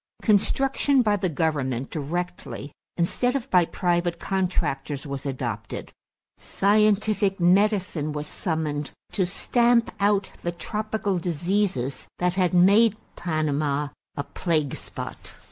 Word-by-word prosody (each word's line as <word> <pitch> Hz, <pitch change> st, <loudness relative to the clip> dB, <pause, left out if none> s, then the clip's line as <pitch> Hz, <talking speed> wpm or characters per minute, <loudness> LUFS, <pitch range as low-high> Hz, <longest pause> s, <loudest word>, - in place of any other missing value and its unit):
Construction 265 Hz, +5 st, +3 dB
by 210 Hz, -2 st, +3 dB
the 190 Hz, -2 st, -1 dB
government 140 Hz, -5 st, -1 dB
directly 165 Hz, -1 st, -4 dB, 0.3 s
instead 245 Hz, +9 st, +1 dB
of 270 Hz, -2 st, -2 dB
by 180 Hz, -2 st, +5 dB
private 175 Hz, 0 st, 0 dB
contractors 155 Hz, -7 st, -1 dB
was 140 Hz, 0 st, -5 dB
adopted. 120 Hz, -5 st, -4 dB, 0.5 s
Scientific 205 Hz, 0 st, +2 dB
medicine 180 Hz, -4 st, +2 dB
was 150 Hz, 0 st, -4 dB
summoned 150 Hz, -3 st, -2 dB, 0.2 s
to 190 Hz, -4 st, +1 dB
stamp 235 Hz, +5 st, +2 dB
out 200 Hz, -1 st, +2 dB
the 175 Hz, -, -1 dB
tropical 210 Hz, +2 st, -2 dB
diseases 170 Hz, -5 st, -1 dB
that 180 Hz, 0 st, +1 dB
had 185 Hz, -2 st, +2 dB
made 200 Hz, +5 st, +5 dB, 0.2 s
Panama 150 Hz, -3 st, -1 dB, 0.3 s
a 145 Hz, -, -1 dB
plague 155 Hz, -3 st, -1 dB
spot. -, -, -7 dB
175 Hz, 110 wpm, -25 LUFS, 150-205 Hz, 0.5 s, by